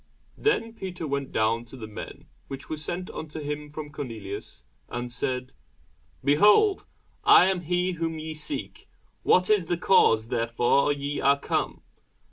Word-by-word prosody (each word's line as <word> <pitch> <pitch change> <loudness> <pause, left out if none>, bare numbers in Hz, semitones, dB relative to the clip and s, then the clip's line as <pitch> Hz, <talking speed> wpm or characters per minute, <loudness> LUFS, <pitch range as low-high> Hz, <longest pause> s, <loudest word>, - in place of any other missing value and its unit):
Then 325 - 0
Peter 185 -6 -6
went 140 -2 -3
down 115 +2 +1
to 130 - -12
the 115 - -7
men 105 -1 -9 0.2
which 135 -1 -8
were 155 - -2
sent 175 +4 -5
unto 155 0 -7
him 150 0 -5
from 150 0 -7
Cornelius; 105 - -7 0.3
and 120 0 -4
said, 125 +1 -2 0.7
Behold, 210 - +4 0.4
I - - +8
am 190 -1 +1
he 180 +2 0
whom 165 -2 -3
ye 155 0 -5
seek: 155 - -3 0.3
what 185 0 +4
is 205 -6 +3
the 175 0 0
cause 115 - +4
wherefore 120 +4 +2
ye 145 0 -3
are 140 +1 +4
come? - - -2
150 Hz, 150 wpm, -26 LUFS, 125-175 Hz, 0.7 s, I